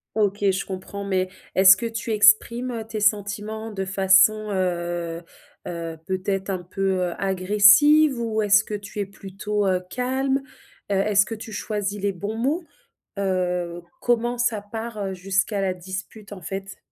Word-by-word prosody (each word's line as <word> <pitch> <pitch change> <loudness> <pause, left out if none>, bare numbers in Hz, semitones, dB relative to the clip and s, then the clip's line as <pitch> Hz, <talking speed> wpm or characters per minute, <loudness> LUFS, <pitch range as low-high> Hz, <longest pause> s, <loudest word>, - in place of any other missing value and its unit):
OK, 205 -1 0
je 190 - -3
comprends 195 +1 -6
mais 185 -1 -1 0.3
est-ce 190 0 +8
que 235 - -4
tu 225 0 -4
exprimes, 220 +4 +4
heu, 230 -2 -4
tes 215 -1 -4
sentiments 210 +2 -1
de 195 -2 -3
façon, 195 +3 +4
heu 175 -2 -2 0.5
heu, 165 -1 -5
peut-être 190 +1 -2
un 185 -2 -3
peu, 195 +2 -1 0.2
heu, - - -5
agressive? 205 +9 +5
Ou 220 -2 -1
est-ce 210 +1 +5
que 210 - -8
tu 205 0 -6
es 200 - 0
plutôt, 200 +1 -3
heu, 185 -1 +1
calme? 265 +2 0 0.5
Heu, - - +2
est-ce 200 0 +3
que 225 - -5
tu 220 0 -9
choisis 205 -1 -3
les 200 -1 0
bons 205 +5 -5
mots? 295 +9 0 0.6
Heu, 180 -2 -1 0.2
comment 240 0 +1
ça 235 -3 +1
part, 225 +2 -7
heu, 190 - -3
jusqu'à 195 +2 -1
la 190 -1 0
dispute 190 +3 -8
en 185 - -10
fait? 195 +3 -6
200 Hz, 165 wpm, -23 LUFS, 190-220 Hz, 0.6 s, est-ce